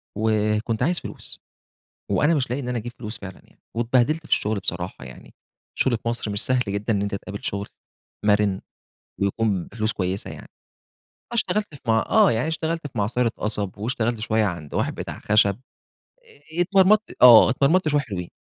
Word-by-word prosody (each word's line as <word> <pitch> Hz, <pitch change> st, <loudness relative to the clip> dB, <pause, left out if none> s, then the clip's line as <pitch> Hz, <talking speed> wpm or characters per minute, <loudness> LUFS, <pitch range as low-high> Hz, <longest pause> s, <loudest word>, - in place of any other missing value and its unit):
وكنت 110 Hz, +1 st, 0 dB
عايز 175 Hz, +2 st, +1 dB
فلوس، -, -, -9 dB, 0.7 s
وأنا 160 Hz, +3 st, +3 dB
مش 130 Hz, -5 st, -1 dB
لاقي 125 Hz, +3 st, -1 dB
إن 125 Hz, -, -5 dB
أنا 125 Hz, -1 st, -1 dB
أجيب 120 Hz, +2 st, -6 dB
فلوس 110 Hz, -1 st, -6 dB
فعلًا 95 Hz, -1 st, -9 dB
يعني، -, -, -27 dB
واتبهدلت 120 Hz, +6 st, +2 dB
في -, -, -14 dB
الشغل 105 Hz, 0 st, +1 dB
بصراحة 90 Hz, -5 st, -4 dB
يعني. 65 Hz, 0 st, -13 dB, 0.4 s
الشغل 125 Hz, -3 st, +2 dB
في 115 Hz, -, -5 dB
مصر 115 Hz, -2 st, -2 dB
مش 100 Hz, 0 st, +1 dB
سهل 130 Hz, -1 st, +2 dB
جدًا 100 Hz, +3 st, -1 dB
إن 100 Hz, -2 st, 0 dB
أنتَ 100 Hz, 0 st, -2 dB
تقابل 100 Hz, 0 st, -6 dB
شغل، 100 Hz, +1 st, -3 dB, 0.6 s
مَرِن 105 Hz, -2 st, +2 dB, 0.6 s
ويكون 100 Hz, -2 st, 0 dB
بفلوس 110 Hz, -1 st, -2 dB
كويسة 95 Hz, +1 st, -3 dB
يعني. -, -, -9 dB
أنا -, -, -15 dB, 0.9 s
اشتغلت 210 Hz, -7 st, -1 dB
في 140 Hz, -, -14 dB
مع 110 Hz, -1 st, +2 dB
آه -, -, +5 dB
يعني 115 Hz, +6 st, 0 dB
اشتغلت 160 Hz, -1 st, -2 dB
في 135 Hz, -, -11 dB
معصرة 115 Hz, +3 st, +1 dB
قصب، 105 Hz, -3 st, -2 dB
واشتغلت 115 Hz, +1 st, -1 dB
شوية 110 Hz, 0 st, +1 dB
عند 85 Hz, -7 st, -5 dB
واحد -, -, -1 dB
بتاع -, -, -6 dB
خشب. 105 Hz, 0 st, +3 dB, 1.0 s
إ -, -, +1 dB
اتمرمطت 195 Hz, +4 st, +3 dB
آه 120 Hz, -3 st, +9 dB
اتمرمطت 155 Hz, +7 st, +2 dB
شوية 145 Hz, -1 st, +2 dB
حلوين. 90 Hz, -, -6 dB
110 Hz, 175 wpm, -23 LUFS, 100-130 Hz, 1.0 s, آه